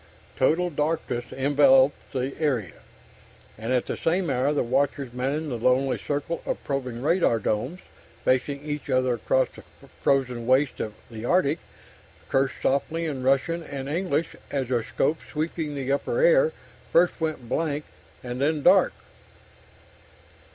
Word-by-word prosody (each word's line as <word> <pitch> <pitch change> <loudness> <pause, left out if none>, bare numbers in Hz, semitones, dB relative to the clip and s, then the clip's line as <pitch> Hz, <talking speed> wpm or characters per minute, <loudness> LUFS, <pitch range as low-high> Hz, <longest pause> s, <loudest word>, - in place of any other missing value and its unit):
Total 170 +7 +2
darkness 150 -5 -1
enveloped 135 0 +4
the 135 0 -2
area. 125 - -1 0.7
And 115 +3 -5
at 125 -1 +2
the - - -3
same 170 -1 0
hour, 130 +2 +1
the 150 - +1
watchers 130 +1 0
manning 140 +5 -2
the 120 -3 -3
lonely 125 +2 +2
circle 145 +3 -3
of - - -3
probing 130 -3 -3
radar 165 -6 +3
domes, 115 - -2 0.4
facing 140 +2 +1
each 150 -1 -4
other 130 -1 +2
across 130 +3 +1
the - - -13 0.4
frozen 125 -4 +1
wastes 130 +2 +3
of 105 -1 -4 0.2
the 110 -1 -7
Arctic, 165 0 +2 0.7
cursed 135 0 +1
softly 160 +5 0
in 140 -5 -3
Russian 135 +6 +1
and 140 -4 -6
English 165 0 -1
as 135 -3 -2
their 120 -3 +1
scopes 150 +7 -1
sweeping 155 -1 -3
the 135 -1 -2
upper 140 - 0
air - - +5 0.4
first 175 0 +3
went 155 -7 -2
blank 150 +2 -1 0.4
and 125 +1 -5
then 150 0 +1
dark. - - +5
140 Hz, 145 wpm, -25 LUFS, 130-155 Hz, 0.7 s, air